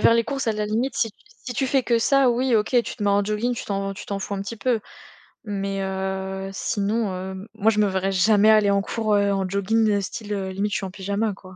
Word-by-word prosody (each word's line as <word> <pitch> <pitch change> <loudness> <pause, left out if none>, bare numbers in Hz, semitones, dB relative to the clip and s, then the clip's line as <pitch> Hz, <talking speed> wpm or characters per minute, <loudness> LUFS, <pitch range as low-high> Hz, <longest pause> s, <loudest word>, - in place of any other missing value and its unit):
faire - - +6
les 230 -1 +3
courses 275 -3 -3
à 225 - +2
la 210 0 -2
limite 235 +6 -1
si 225 - +1
tu - - -42 0.3
si 250 - -3
tu 265 +2 0
fais 265 0 +2
que 235 -1 +2
ça 275 +2 +4
oui 245 +1 +2
OK 215 -1 +2
tu - - -7
te 210 - -6
mets 205 - +2
en 200 0 +3
jogging 215 +4 -1
tu - - -6
t'en 195 -1 -2
tu - - -9
t'en 200 - -3
fous 200 +1 -4
un 195 - -3
petit 225 +3 -6
peu. 240 -1 0 0.7
Mais, 195 -1 -2
heu, 190 0 -3
sinon, 205 +2 -1
hem, 190 +2 -6
moi 220 +1 +3
je 210 - -1
me 210 - +4
verrais 190 0 0
jamais 210 +3 +4
aller 215 -2 +5
en 200 0 +3
cours, 215 +1 -1
heu, 200 0 +3
en 195 -1 0
jogging, 205 +4 +1
heu, 205 -1 +2
style, 210 +2 -5
heu, 190 -1 -2
limite 200 +2 -2
je - - +1
suis 195 - -4
en 185 - -6
pyjama 200 +2 -2
quoi. 185 -1 -14
205 Hz, 270 wpm, -23 LUFS, 195-225 Hz, 0.7 s, faire